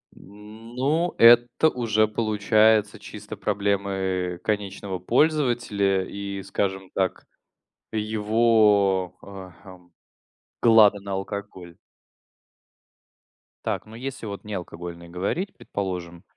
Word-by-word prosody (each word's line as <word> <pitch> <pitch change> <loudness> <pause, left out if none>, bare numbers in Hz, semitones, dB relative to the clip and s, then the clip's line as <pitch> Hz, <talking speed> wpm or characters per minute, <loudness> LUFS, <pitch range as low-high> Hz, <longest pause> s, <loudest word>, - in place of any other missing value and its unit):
Ну, 115 - -4
это 120 +6 +6
уже 110 -5 +1
получается 110 -1 +2
чисто 105 0 -9
проблемы 95 -3 -1
конечного 100 -3 -3
пользователя 120 - +1
и, 100 0 -6
скажем 95 -1 -3
так, 95 -2 -2 0.7
его, 105 -4 +2
э, 95 -2 -10
хм, 90 -2 -15 0.7
глады 110 -3 +6
на 100 0 -6
алкоголь. 95 -3 -6 1.9
Так, - - -2
ну, 110 - -13
если 130 -1 -6
вот 100 -1 -7
не 105 - -7
алкогольные 85 -1 -8
говорить, 100 - -3
предположим. 90 -3 -5
100 Hz, 90 wpm, -24 LUFS, 95-110 Hz, 1.9 s, это